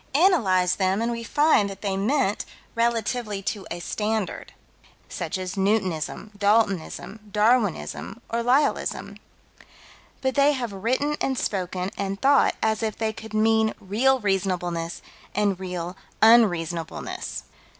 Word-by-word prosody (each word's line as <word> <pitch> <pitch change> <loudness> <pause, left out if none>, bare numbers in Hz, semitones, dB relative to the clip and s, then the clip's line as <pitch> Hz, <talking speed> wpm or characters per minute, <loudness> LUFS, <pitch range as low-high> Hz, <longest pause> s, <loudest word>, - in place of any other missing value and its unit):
Analyze 195 - +3
them 190 +1 +1
and 230 +1 0
we 230 0 -4
find 290 -6 +3
that 195 0 -9
they 195 -2 -1
meant 215 +1 +1 0.3
relatively 230 -3 -1
to 190 +2 -3
a 175 - -4
standard, 215 +2 -2 0.6
such - - -4
as 185 0 -4
Newtonism, 195 -2 -1
Daltonism, 205 -1 0
Darwinism, 210 -1 +1
or 235 +1 -1
Lyellism. 260 +5 +1 1.0
But 265 -1 0
they 285 +2 +4
have 240 -6 -3
written 255 +9 0
and 265 -1 0
spoken 185 -2 -2
and 195 0 -2
thought 275 +1 +4
as 220 0 +1
if 220 -2 -2
they 220 -1 -1
could 220 0 -9
mean 220 0 +3
real 245 +7 +2
reasonableness 180 -5 -1 0.3
and 200 -2 +1
real 180 -1 -4 0.2
unreasonableness. 175 -8 +2
210 Hz, 125 wpm, -25 LUFS, 190-235 Hz, 1.0 s, they